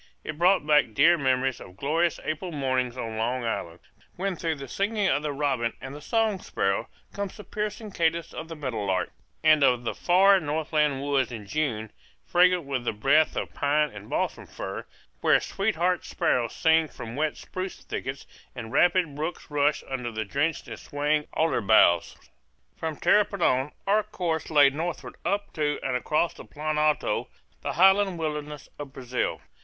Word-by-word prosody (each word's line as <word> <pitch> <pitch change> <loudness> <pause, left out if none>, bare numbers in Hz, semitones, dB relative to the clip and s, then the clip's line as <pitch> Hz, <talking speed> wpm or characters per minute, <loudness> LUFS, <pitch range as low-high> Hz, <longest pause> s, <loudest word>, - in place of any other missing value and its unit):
It 155 0 -6
brought 180 -2 +4
back 150 -7 +3
dear 165 +5 +6
memories 130 -3 0
of 90 +1 -12
glorious 165 +6 +1
April 165 +3 -3
mornings 130 -4 -1
on 115 -3 -4
Long 120 +3 -1
Island, 85 -6 -4 0.3
when 190 +1 -2
through 165 -1 -2
the 140 -1 -8
singing 205 - 0
of 145 -4 +1
robin 140 -5 0
and 140 +3 -8
song 220 +3 +1
sparrow 95 - -1 0.3
comes 200 -1 -5
the 210 - -9
piercing 210 +1 -4
cadence 170 -1 0
of 160 - -6
the 165 - -7
meadowlark; 105 - -2 0.3
and 155 -1 +6
of 125 -3 +3
the 115 - -2
far 190 +2 +5
northland 150 -3 0
woods 140 -4 +1
in 110 -3 -7
June, 110 -4 -2 0.3
fragrant 180 0 +4
with 135 -3 -3
the 120 - -1
breath 135 +9 +3
of - - -3
pine 150 +1 +1
and 105 0 -11
balsam - - -2
fir, - - -6 0.3
where - - +4
sweetheart 180 -3 0
sparrows 120 -2 0
sing 160 0 +3
from 115 -5 -8
wet 155 +1 -1
spruce 185 0 -6
thickets 130 +1 -5 0.3
and 115 -2 -7
rapid 175 -4 +3
brooks 155 +1 -5
rush 145 0 +1
under 125 -3 -3
the 110 -1 -3
drenched 140 +9 -1
and - - -7
swaying 150 +1 -1
alder 160 -6 +1
boughs. 95 -5 +4 0.6
From 160 -1 -4
Tapirapoan 160 -9 +2
our 205 +2 +3
course 175 -6 -3
lay 145 -3 +6
northward 165 +3 -4
up 205 +1 -2
to 150 -1 -1
and 130 -2 -1
across 155 +6 +1
the - - -11
Plan 155 0 -3
Alto, 150 0 +1 0.3
the - - -3
highland 190 0 +4
wilderness 150 -2 -4
of 140 -2 -7
Brazil. 125 -1 -2
150 Hz, 165 wpm, -26 LUFS, 130-170 Hz, 0.6 s, dear